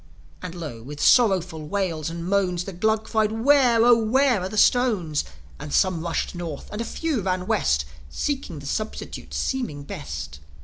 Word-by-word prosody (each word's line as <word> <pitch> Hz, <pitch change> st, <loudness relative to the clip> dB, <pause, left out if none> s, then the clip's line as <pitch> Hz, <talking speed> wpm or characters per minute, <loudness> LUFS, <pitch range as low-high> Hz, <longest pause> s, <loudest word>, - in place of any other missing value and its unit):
And 180 Hz, -1 st, -6 dB
lo, 150 Hz, -10 st, -6 dB
with 145 Hz, +5 st, -9 dB
sorrowful 185 Hz, -, +3 dB
wails 165 Hz, -4 st, -1 dB
and 170 Hz, 0 st, -6 dB
moans, 180 Hz, -2 st, +1 dB
The 195 Hz, -, -7 dB
Glugs 220 Hz, +4 st, 0 dB
cried, 215 Hz, -1 st, +2 dB
"Where, 240 Hz, 0 st, +4 dB
Oh, 240 Hz, -1 st, +8 dB
where 250 Hz, -1 st, +3 dB
are 185 Hz, -, -3 dB
the 215 Hz, -, -6 dB
stones?" 205 Hz, -, +3 dB, 0.4 s
And 145 Hz, 0 st, -7 dB
some 185 Hz, -1 st, +2 dB
rushed 170 Hz, 0 st, -2 dB
North, 170 Hz, -5 st, -6 dB
and 210 Hz, -, -4 dB
a -, -, -2 dB
few 315 Hz, -5 st, -2 dB
ran 185 Hz, -1 st, -1 dB
West; 70 Hz, -, +1 dB, 0.2 s
Seeking 270 Hz, -, -3 dB
the 145 Hz, -, -9 dB
substitutes 215 Hz, +9 st, -4 dB
seeming 235 Hz, -, -2 dB
best. 70 Hz, -, -7 dB
185 Hz, 170 wpm, -24 LUFS, 155-220 Hz, 0.4 s, Oh